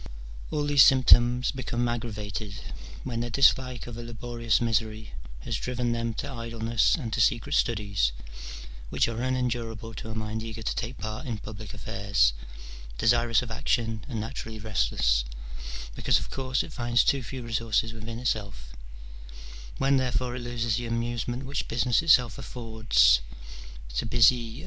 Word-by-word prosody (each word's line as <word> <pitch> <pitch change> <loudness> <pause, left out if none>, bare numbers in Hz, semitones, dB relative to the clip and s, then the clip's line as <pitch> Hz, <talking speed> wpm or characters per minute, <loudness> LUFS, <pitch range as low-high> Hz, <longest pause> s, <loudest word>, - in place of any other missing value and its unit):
All 150 -1 -1
these 145 -2 +7
symptoms 125 -1 +5
become 120 -2 -2
aggravated 105 -3 -4 0.5
when 120 -3 -3
their 120 0 -2
dislike 125 0 +3
of 120 -1 -8
a - - -5
laborious 115 0 -1
misery 110 - -1 0.3
has - - -2
driven 125 -1 -2
them 115 -1 -2
to 140 - -4
idleness 115 -2 +1
and 120 -9 -5
to 120 - +1
secret 120 +6 +2
studies, 100 - +1 0.8
which - - +2
are 115 0 -3
un 130 0 0
endurable 115 -3 -3
to 110 - -7
a 110 - -5
mind 110 0 -3
eager 115 0 -6
to - - -1
take 120 +1 -4
part 110 +7 -5
in 115 -3 -2
public 105 0 -8
affairs, 100 - +1 0.6
desirous 120 - +3
of 120 - -7
action 110 0 -1
and 115 -5 -3
naturally 110 0 -5
restless, - - +1 0.7
because, - - +2
of - - -5
course, 130 -1 -1
it 155 - -10
finds 120 -1 +2
too 140 - +2
few 125 +1 -7
resources 115 -1 0
within 115 +1 -7
itself: 100 - -3 1.0
when 135 0 +3
therefore 125 -1 -1
it 125 - -5
loses 120 -2 -1
the 120 -1 -3
amusement 120 +2 -2
which 140 +1 -3
business 120 0 +2
itself 125 -8 +4
affords 110 - +3 0.7
to - - -1
busy 115 -1 +4
CH. - - -9
115 Hz, 155 wpm, -27 LUFS, 110-125 Hz, 1.0 s, these